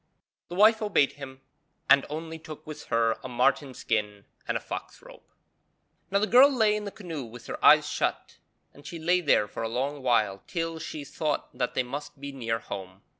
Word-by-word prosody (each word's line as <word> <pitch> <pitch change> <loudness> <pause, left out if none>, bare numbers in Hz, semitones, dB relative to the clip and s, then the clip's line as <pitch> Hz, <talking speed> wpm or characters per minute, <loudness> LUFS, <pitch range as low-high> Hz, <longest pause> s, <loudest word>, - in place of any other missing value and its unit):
The 175 - -7
wife 215 +3 +5
obeyed 200 -10 +3
him, 135 -2 -10 0.5
and 140 -1 +5
only 160 +2 -6
took 155 -1 -10
with 155 -1 -8
her 115 -1 +1
a 130 - -6
marten 130 +2 +1
skin 105 -2 -2 0.2
and - - 0
a - - -5
fox - - -7
robe. - - -15 0.9
Now 200 - +2
the 205 - +2
girl 255 +5 +7
lay 220 -5 +3
in 210 0 -4
the 200 - -5
canoe 170 -10 -6
with 120 0 -11
her - - -7
eyes - - +7
shut, - - -2 0.3
and 145 - -16
she 170 +3 -7
lay 175 +3 +2
there 145 -9 +3
for 105 - -7
a 115 - -2
long 135 +5 -2
while 110 -6 +1
till 165 -2 -3
she 155 -2 -6
thought 150 +1 -3
that 125 -1 -2
they 130 - +2
must 140 +3 -7
be 140 0 -6
near 115 -4 -2
home. 95 -3 -8
140 Hz, 200 wpm, -27 LUFS, 120-165 Hz, 0.9 s, girl